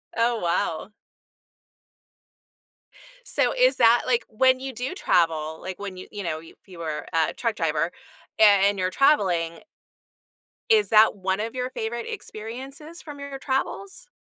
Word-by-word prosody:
Oh, 230 0 +1
wow. 170 +2 -1 2.4
So, - - +1
is - - +4
that 235 0 +5
like 240 -2 +1
when 255 +3 +3
you 265 0 -5
do 250 +6 -4
travel, 160 - +1
like, 185 -1 -7
when 200 -2 -6
you, 185 - -9
you 205 -1 -6
know, 160 -3 -3
you 165 - -14
if - - -37
you 180 - -12
were 155 -2 -4
a 160 -1 +1
truck 230 -3 -2
driver 165 -1 0 0.5
a - - +6
and 200 -1 +5
you're 185 0 -1
traveling 185 - +2 1.1
is 435 -2 +4
that 220 0 +6
one 190 0 -1
of 225 +3 -3
your 250 0 -3
favorite 235 -1 -4
experiences 270 +9 -7
from 295 -2 -10
your 280 -1 -6
travels? 385 - -3
220 Hz, 150 wpm, -25 LUFS, 180-260 Hz, 2.4 s, a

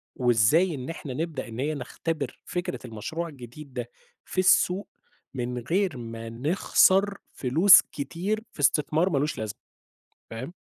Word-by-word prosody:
وإزاي 125 +8 +3
إن 130 +2 -6
إحنا 145 -5 -6
نبدأ 155 -3 -4
إن 115 +1 -8
هي 150 +3 0
نختبِر 150 -1 -4
فكرة 175 -8 -3
المشروع 120 +9 -5
الجديد 135 -1 -11
ده، 120 -1 -5 0.4
في - - -10
السوق 185 +1 +3 0.5
من 125 -1 -3
غير 175 - 0
ما 115 -1 -7
نخسَر 190 - +3 0.2
فلوس 160 +10 +7
كتير 175 - -4
في - - -19
إستثمار 150 +5 +2
ما 145 - 0
لوش 145 +2 -1
لازمة، 110 -1 -5 0.7
فاهم؟ 120 +8 -6
145 Hz, 140 wpm, -26 LUFS, 125-170 Hz, 0.7 s, فلوس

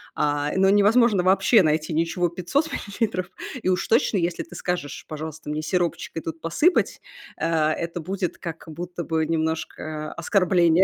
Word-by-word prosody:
а. 145 0 0
Но 190 0 +5
невозможно 205 0 +5
вообще 195 +3 +5
найти 155 +1 +1
ничего 170 +2 +1
500 185 - -1
миллилитров. 200 -3 -2 0.3
И - - -1
уж 180 - 0
точно, 230 -3 +3
если 170 -1 -1
ты 330 - -13
скажешь: 175 -6 -3
"Пожалуйста, 155 0 -6
мне 150 +1 -2
сиропчик 175 +1 -1
и - - -2
тут 165 0 -6
посыпать",- 295 - +2 0.4
а, 155 -2 +1
это 170 +1 -4
будет 185 +1 -3
как 165 -1 -7
будто 175 +2 -5
бы 160 -1 0
немножко 155 -1 -3
оскорбление 180 -2 +3
170 Hz, 155 wpm, -24 LUFS, 160-190 Hz, 0.4 s, Но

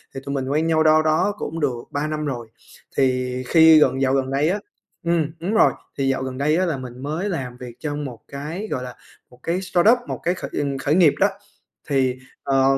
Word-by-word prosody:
thì - - -3
tụi 140 - -3
mình 135 -1 -2
quen 155 +3 +1
nhau 160 -1 +3
đâu 155 0 +5
đó 155 +6 +2
cũng 160 +2 -4
được 125 -6 -1
3 145 +2 -1
năm 155 0 -3
rồi. 120 -5 -4 0.5
Thì 125 -1 +1
khi 160 +1 +7
gần 135 -3 +3
dạo 135 -1 +2
gần 135 -1 0
đây 140 +3 +2
á 200 +4 0 0.5
ừm, 165 -3 +1
đúng 185 +6 -2
rồi, 225 - +5 0.3
thì 135 -1 0
dạo 135 0 0
gần 130 -1 -5
đây 150 +3 +2
á 185 - +2
là 165 -5 -1
mình 125 -1 -8
mới 160 +8 -2
làm 130 -9 -4
việc 125 -2 -9
trong 150 -1 -3
một 125 -4 -7
cái, 155 +9 -5
gọi 125 - -2
là, 125 -1 -8 0.3
một 125 - -19
cái 175 +3 -1
startup, 190 +5 +4
một - - -4
cái 175 - +2
khởi, 185 - -6
ừm, 140 -2 -1
khởi 145 +3 +1
nghiệp 170 -5 +6
đó. 200 - +5 0.6
Thì, 130 -3 +2 0.3
ờ, 135 -1 +2
145 Hz, 230 wpm, -22 LUFS, 130-165 Hz, 0.6 s, khi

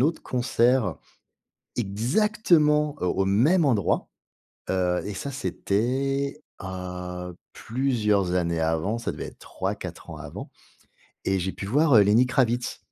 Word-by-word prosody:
autre 155 +5 +1
concert 125 0 +1 0.8
exactement, 150 - +2
heu, 90 - +1
au 95 +2 +1
même 145 - +4
endroit. 105 -9 +1 0.6
Heu, 90 -1 +1
et 105 - -4
ça, 140 +8 -5
c'était, 130 +6 -1 0.2
heu, 90 -1 -6 0.2
plusieurs 110 -7 0
années 85 -2 0
avant, 80 +8 0
ça 115 - -3
devait - - -6
être - - -10
3-4 - - -5
ans - - -7
avant - - -8 0.7
et 95 0 +1
j'ai 95 +1 -2
pu 100 - -6
voir, 145 +5 +3
heu, 105 - +9
Lenny 110 +5 +4
Kravitz. 125 -1 0
115 Hz, 130 wpm, -25 LUFS, 95-135 Hz, 0.8 s, heu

